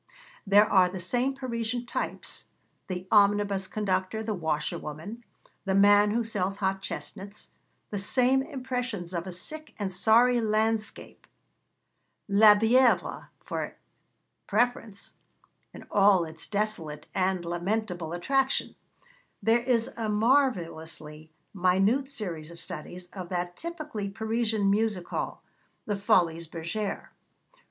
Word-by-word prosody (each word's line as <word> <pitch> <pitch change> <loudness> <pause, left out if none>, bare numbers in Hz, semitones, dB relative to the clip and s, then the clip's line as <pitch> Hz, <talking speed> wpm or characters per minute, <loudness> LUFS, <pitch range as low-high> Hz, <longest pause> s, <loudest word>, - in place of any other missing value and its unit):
There 205 +2 +7
are 190 -4 +4
the 185 +1 -6
same 245 +9 0
Parisian 245 -2 -3
types - - -4 0.4
the 185 0 -5
omnibus 200 -2 +3
conductor, 190 +1 -1
the 220 -1 -2
washerwoman, 160 +4 -4 0.4
the 190 -1 +1
man 205 +1 +6
who 230 +3 +1
sells 195 -3 -2
hot 195 -1 -1
chestnuts 200 +1 -7 0.4
the 205 - -2
same 255 +6 +3
impressions 250 - -4
of 170 +1 -3
a - - -4
sick 310 - -7
and 195 -3 -3
sorry 235 +6 +4
landscape, 220 0 -1 1.0
La 210 +1 +7
Bièvre, 235 +3 +3 0.2
for - - -4 0.7
preference, 225 -2 -1 0.6
in - - -11
all 195 -3 +5
its 160 0 -9
desolate 200 -8 -3
and 185 -2 0
lamentable 175 -1 -2
attraction; 265 +10 0 0.7
there 230 +2 +4
is 240 -1 +1
a 225 -2 -2
marvellously 170 - 0 0.2
minute 195 +8 +2
series 175 - -5
of 170 0 -12
studies 180 +1 -7
of 185 -3 -7
that 175 -1 -3
typically 305 - -5
Parisian 220 0 0
music 205 -2 +1
hall, - - -4 0.4
the 205 - -1
Folies 170 -4 +2
Bergère. 170 +6 -4
205 Hz, 115 wpm, -28 LUFS, 180-225 Hz, 1.0 s, There